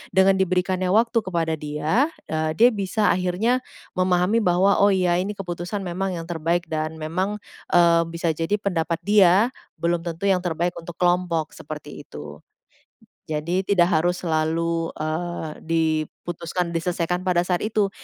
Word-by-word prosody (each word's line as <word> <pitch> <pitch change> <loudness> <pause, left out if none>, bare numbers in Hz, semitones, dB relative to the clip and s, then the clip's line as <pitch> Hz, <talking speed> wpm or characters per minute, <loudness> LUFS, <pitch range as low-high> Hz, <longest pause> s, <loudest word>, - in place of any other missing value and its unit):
dengan 190 0 +5
diberikannya 185 0 +1
waktu 230 +3 +3
kepada 170 -4 -1
dia, 155 - 0 0.2
eee, 155 0 -1
dia 240 +2 +7
bisa 205 +1 +1
akhirnya 185 +8 +1 0.3
memahami 185 +4 +2
bahwa, 185 +1 +3
oh 200 - +6
iya 180 -2 +2
ini 200 +3 -2
keputusan 180 +2 -4
memang 185 +1 -2
yang 165 - -5
terbaik 170 +1 0
dan 155 0 -2
memang, 180 +6 -2 0.4
eee, 170 -1 +6
bisa 165 0 -1
jadi 165 +6 -1
pendapat 170 -4 -1
dia 205 +3 +5 0.3
belum 170 0 0
tentu 170 +3 -3
yang 185 -2 +2
terbaik 175 +1 -1
untuk 165 0 -8
kelompok, 175 -3 +1
seperti - - -8
itu. - - -10 0.9
Jadi 165 +3 -1
tidak 180 -4 +3
harus 175 +3 +1
selalu, 165 0 0
eee, 160 +1 -3 0.2
diputuskan, 165 +2 -1
diselesaikan 175 +1 -1
pada 180 -2 +3
saat 180 -1 0
itu. 210 -2 +1
175 Hz, 145 wpm, -23 LUFS, 165-190 Hz, 0.9 s, dia